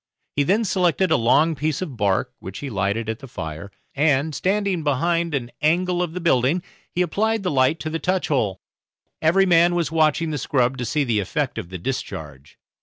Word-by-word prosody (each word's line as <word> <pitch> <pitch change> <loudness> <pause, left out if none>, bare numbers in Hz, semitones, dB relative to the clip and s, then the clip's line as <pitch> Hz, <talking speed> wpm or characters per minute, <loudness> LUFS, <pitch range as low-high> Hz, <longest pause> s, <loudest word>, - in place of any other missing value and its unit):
He 145 - +2
then 200 +10 +2
selected 185 -1 +1
a - - +6
long 150 +8 +3
piece 150 0 -1
of 160 -8 -5
bark, 100 -3 0
which 95 +2 -8
he 140 -2 -6
lighted 100 +2 -1
at 110 0 -3
the 135 - -10
fire, 85 -4 -6 0.2
and, 145 +1 +2
standing 195 -1 0
behind 165 +3 +1
an 120 -3 -3
angle 175 +3 +2
of 175 -2 -2
the 180 - -4
building, 165 +1 +2 0.3
he 180 - 0
applied 215 +5 0
the 180 - 0
light 135 +4 +2
to 155 - -3
the 165 - -2
touch 185 +1 0
hole. 105 - 0 0.6
Every 175 +5 +4
man 175 -1 +4
was 170 -3 0
watching 160 0 +2
the 150 - -2
scrub 125 0 0
to 125 - -2
see 150 +4 0
the 115 -5 +1
effect 125 - -2
of 90 -6 -7
the 90 - -6
discharge. 75 - -6
150 Hz, 200 wpm, -22 LUFS, 120-175 Hz, 0.6 s, a